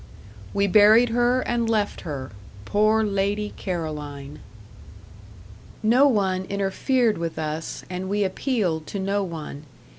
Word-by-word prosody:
We 200 0 +1
buried 215 +4 +6
her 245 +2 +2
and 235 -2 -1
left 215 -2 0
her 140 - -6 0.3
poor 215 +2 +3
Lady 205 +1 -1
Caroline! 150 -6 -5 1.4
No 245 +6 +5
one 190 -6 +1
interfered 200 +4 0
with 165 -1 -4
us, 155 0 -4
and 185 +1 -5
we 205 +1 +1
appealed 190 - -1
to 200 - -5
no 200 +1 0
one. 155 -4 -7
200 Hz, 120 wpm, -24 LUFS, 165-220 Hz, 1.4 s, buried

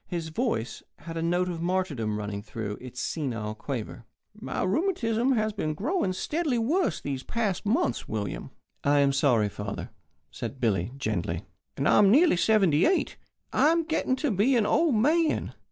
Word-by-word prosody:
His 170 -3 -4
voice 160 - -2 0.2
had 165 -1 -8
a 165 - -2
note 175 +2 +1
of 170 -2 -4
martyrdom 165 - -1
running 105 -1 -4
through 105 -1 -6
its 125 0 -8
senile 120 -8 -3
quaver. 115 0 -6 0.3
"My - - -4
rheumatism 245 - +1
has 215 -2 0
been 155 -7 -2
growing 250 - 0
steadily 300 - -1
worse 240 - +1
these 135 -2 -4
past 210 - -2
months, 165 - 0
William." 105 -3 -4 0.3
"I 145 +1 +3
am 140 -1 +3
sorry, 125 -6 +3
father," 105 0 -6 0.4
said 135 - -6
Billy, 105 -4 0
gently. 95 -8 -2 0.3
"And 140 - +1
I - - +5
am 200 -2 +6
nearly 300 - +5
seventy 180 -5 +3
eight. 370 +2 +1 0.4
I 300 - +4
am 335 +1 +2
getting 315 -5 0
to 285 0 -1
be 215 +7 +3
an 225 -3 +3
old 320 +2 +3
man. 310 +8 +2
175 Hz, 170 wpm, -27 LUFS, -, 0.4 s, am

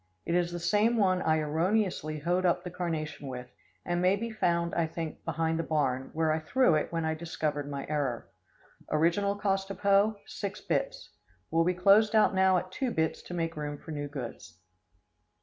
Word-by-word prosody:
It 170 - -1
is 175 0 +1
the 175 - -4
same 210 +6 +2
one 185 -3 +3
I 160 0 +2
erroneously 160 +1 0
hoed 175 +5 0
up 175 -2 +2
the 180 - -6
carnation 160 -5 -4
with, 125 -1 -7 0.3
and 175 0 0
may 185 +2 +4
be 230 +3 -4
found, 170 -5 0
I 170 -1 +1
think, 160 0 -6
behind 165 0 0
the - - 0
barn, 135 -5 0
where 160 0 +1
I 155 - +1
threw 250 +5 +3
it 155 - 0
when 165 -1 -1
I 160 - +1
discovered 155 -3 -3
my 140 -1 -4
error. 140 -6 -2 0.6
Original 170 +6 +2
cost 195 -1 -1
of 195 - -7
hoe, 200 +2 +4
six 200 0 -5
bits. - - -2 0.4
Will 165 0 +3
be 180 +1 +1
closed 205 +4 +5
out 215 -1 +5
now 190 0 +4
at 185 +1 -4
two 260 +6 -1
bits 160 -7 -1
to 175 - -8
make 165 -1 -2
room 145 -1 -4
for 160 - -10
new 145 -1 -3
goods. 125 - -8
170 Hz, 195 wpm, -29 LUFS, 155-195 Hz, 0.6 s, closed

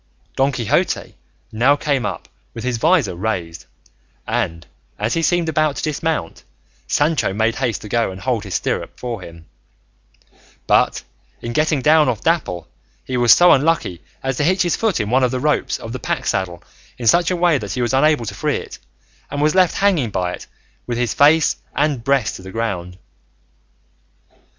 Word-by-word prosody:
Don 135 +1 +2
Quixote 120 -6 -1 0.4
now 125 +6 +3
came 145 -3 -1
up - - -6 0.3
with 115 - -6
his 125 -1 -1
visor 160 - +3
raised, 85 - -4 0.6
and 95 -8 -2 0.3
as 110 - -1
he 165 - 0
seemed 175 0 +1
about 155 -2 +1
to - - -5
dismount 155 - -2 0.4
Sancho 145 - +1
made 110 +2 0
haste 125 -6 -2
to - - -7
go 115 0 0
and 95 0 -8
hold 120 -1 -1
his 100 -3 -5
stirrup - - -3
for 120 -5 -5
him; 85 -2 -12 1.2
but - - +2 0.4
in 120 - -5
getting 155 -1 +1
down 155 -2 +5
off 115 -5 -2
Dapple 120 - 0 0.4
he 130 - -4
was 120 -1 +4
so 175 0 +7
unlucky 140 - +1 0.2
as 135 -1 -2
to - - +1
hitch 185 +4 +2
his 175 - +1
foot 220 -5 0
in 105 +1 -2
one 130 +1 +3
of 125 - +3
the 130 +1 -2
ropes 150 +2 0
of 115 - -8
the 130 - -5
pack - - -3
saddle 90 -2 -2 0.3
in 120 - -6
such 170 +10 +4
a 185 - 0
way 170 -4 +2
that - - -5
he 125 - -2
was 120 - -1
unable 140 -2 +3
to - - -5
free - - -1
it, - - -9 0.5
and 145 - -4
was 150 +1 +2
left 185 -2 +3
hanging 180 - +2
by 90 -3 -2
it - - -9 0.4
with 120 -1 -2
his 120 -2 0
face 150 +2 +4 0.2
and 145 -6 0
breast 135 -6 0
on - - -12
the 95 - -9
ground. 90 -5 -3
125 Hz, 185 wpm, -19 LUFS, 110-155 Hz, 1.2 s, so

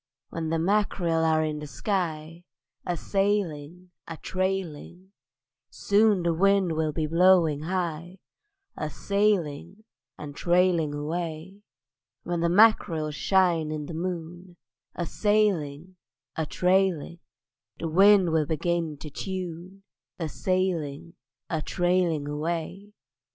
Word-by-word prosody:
When 165 -1 -4
the 165 - 0
mack'rel 175 -2 +1
are 160 -1 +2
in 155 -1 -2
the 150 - -7
sky, 165 - -3 0.4
A 175 -1 -1
sailing, 180 -4 -2 0.2
a 165 - -7
trailing; 185 -1 -4 0.6
Soon 205 -2 +2
the 170 -1 +1
wind 195 +1 +3
will 160 -1 0
be 155 +1 -2
blowing 165 -2 +4
high: 175 0 -3 0.6
A 155 - -4
sailing 195 +1 -1 0.3
and 145 -1 -8
trailing 175 -4 +2
away. 165 +5 -5 0.6
When 175 -1 -2
the 170 0 +1
mack'rel 175 -6 +4
shine 170 -1 +1
in 150 -1 -4
the 165 - -7
moon, 175 +1 -6 0.4
A 175 - -2
sailing, 185 -5 0 0.4
a 160 -2 -2
trailing; 180 -2 +1 0.6
Then 165 - -3
the - - -4
wind 190 +1 +5
will 155 -2 +1
begin 165 -1 -1
to 150 +1 -9
tune: 185 +2 -6 0.3
A 165 -3 -3
sailing, 170 -4 -2 0.3
a 160 -2 -2
trailing 175 -4 0
away. 165 +6 -4
170 Hz, 120 wpm, -26 LUFS, 155-185 Hz, 0.6 s, wind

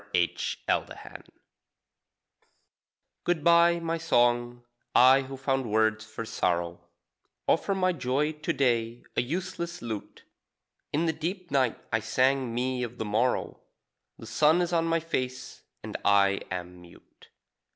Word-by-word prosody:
THE 85 -1 +2 0.3
BROKEN - - -1
LUTE - - -11 2.0
Good 175 -4 0
bye, 170 0 +5
my 165 0 -2
song 120 -5 +1 0.3
I, 130 +2 +7
who 135 0 -8
found 135 -2 -1
words 110 0 +2
for 110 +1 -7
sorrow, 85 -4 -1 0.7
Offer 195 +4 +2
my 185 -1 +2
joy 145 +1 0
to 150 -1 -3
day 120 -3 0
a - - +3
useless 170 +4 -4
lute. 110 -4 -7 0.7
In 155 +3 +1
the 160 - +1
deep 175 +2 -5
night 130 -4 +2 0.2
I 115 - +3
sang 130 +3 +1
me 125 +2 -1
of 120 0 -5
the 110 - -3
morrow; 110 +5 0 0.6
The - - -11
sun 155 +3 +3
is 175 0 -3
on 165 -1 +2
my 165 0 +1
face 130 -6 -4 0.2
and - - -7
I 100 -1 +4
am 90 -1 -6
mute. 85 -1 -19
130 Hz, 140 wpm, -28 LUFS, 115-165 Hz, 2.0 s, I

